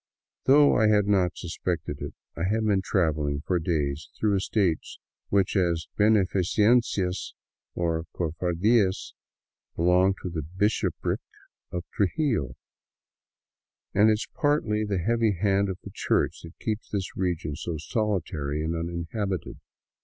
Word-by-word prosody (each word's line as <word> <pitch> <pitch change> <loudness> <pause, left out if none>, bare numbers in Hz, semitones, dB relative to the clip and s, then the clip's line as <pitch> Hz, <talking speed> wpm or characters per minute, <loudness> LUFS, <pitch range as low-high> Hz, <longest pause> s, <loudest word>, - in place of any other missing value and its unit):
Though 145 +2 +6
I 110 -2 +4
had 105 -1 +4
not 95 -4 +2
suspected 80 -3 -3
it, 70 - -6 0.2
I 85 - -2
had 110 +3 +1
been 100 -3 +2
traveling 75 -7 0
for 90 0 +1
days 75 -3 -1
through 105 -2 +2
estates 95 -4 0 0.3
which, 100 0 +2
as 85 -4 +1
heneiicencias 105 -1 +2 0.4
or 85 -1 -1
cofardias, 90 +5 +1 0.6
belong 90 +3 +3
to 90 - -3
the 80 -2 -3
bishopric 95 +8 -1 0.5
of 90 -1 -3
Trujillo, 100 - 0 1.4
and 105 +2 +5
it - - +5
is 105 - -3
partly 130 -8 +1
the 100 -2 -1
heavy 115 +4 +2
hand 100 +1 +1
of 95 - -3
the - - -9
Church - - 0
that 85 - -12
keeps 110 -1 -3
this 100 -2 -3
region 85 -5 -2
so 80 +1 -4
solitary 80 -6 -2
and 80 +1 -1
uninhabited. 85 +4 -3
95 Hz, 130 wpm, -26 LUFS, 85-105 Hz, 1.4 s, Though